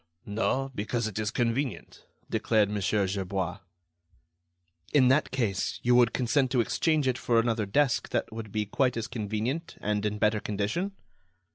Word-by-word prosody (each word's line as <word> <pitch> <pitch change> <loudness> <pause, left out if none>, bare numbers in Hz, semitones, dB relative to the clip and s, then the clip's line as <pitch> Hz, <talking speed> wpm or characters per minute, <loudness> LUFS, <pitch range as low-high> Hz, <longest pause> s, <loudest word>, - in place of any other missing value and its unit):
"No; 130 +6 -1
because 115 +2 -2
it 110 0 -4
is 105 -1 0
convenient," 120 - -2 0.2
declared 105 -3 +2
Mon. 105 -1 -2
Gerbois. 95 -2 -1 1.3
"In 130 -4 +5
that 145 +4 +3
case, 115 -8 -1
you 125 - +4
would 120 -2 +5
consent 130 +2 +1
to 130 -1 +1
exchange 150 +5 +1
it 130 -1 0
for 115 -1 +2
another 115 -2 0
desk 135 +4 +1
that - - -2
would 110 -2 -7
be 105 0 -1
quite 125 +4 +1
as 115 - -2
convenient 115 +8 -3
and 105 0 -1
in 105 0 -1
better 105 0 +2
condition?" 105 - -2
115 Hz, 155 wpm, -28 LUFS, 105-130 Hz, 1.3 s, In